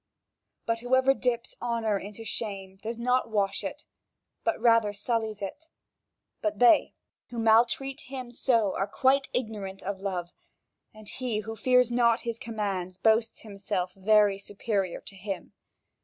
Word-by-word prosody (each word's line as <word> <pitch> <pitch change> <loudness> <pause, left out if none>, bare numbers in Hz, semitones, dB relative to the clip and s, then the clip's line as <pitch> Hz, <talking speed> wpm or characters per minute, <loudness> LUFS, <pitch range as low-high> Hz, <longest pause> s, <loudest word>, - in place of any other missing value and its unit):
But 230 0 0
whoever 260 +2 +3
dips 245 -3 -1
honour 230 -4 0
into 210 +3 -8
shame, 195 -4 -4
does 230 +1 -4
not 250 +1 +1
wash 200 -3 0
it, - - -6 0.6
but 340 - 0
rather 230 -3 +4
sullies 220 0 -2
it. 195 +11 -6 0.8
But 320 0 -1
they, 245 -1 +5 0.3
who 240 - -8
maltreat 235 +5 +3
him 255 -2 -6
so, 230 -5 +2
are 195 - 0
quite 270 +5 +2
ignorant 210 -5 -4
of 195 0 -4
love; 180 -3 -3 0.6
and 215 -1 -14
he, 240 -3 -2
who 225 +1 -6
fears 250 +1 +3
not 235 -1 +3
his 230 -1 -4
commands, 195 -5 -3
boasts 220 +3 +2
himself 195 -3 -3
very 205 0 +4
superior 200 -2 -2
to 195 - -11
him. 195 -1 -6
220 Hz, 140 wpm, -28 LUFS, 200-240 Hz, 0.8 s, they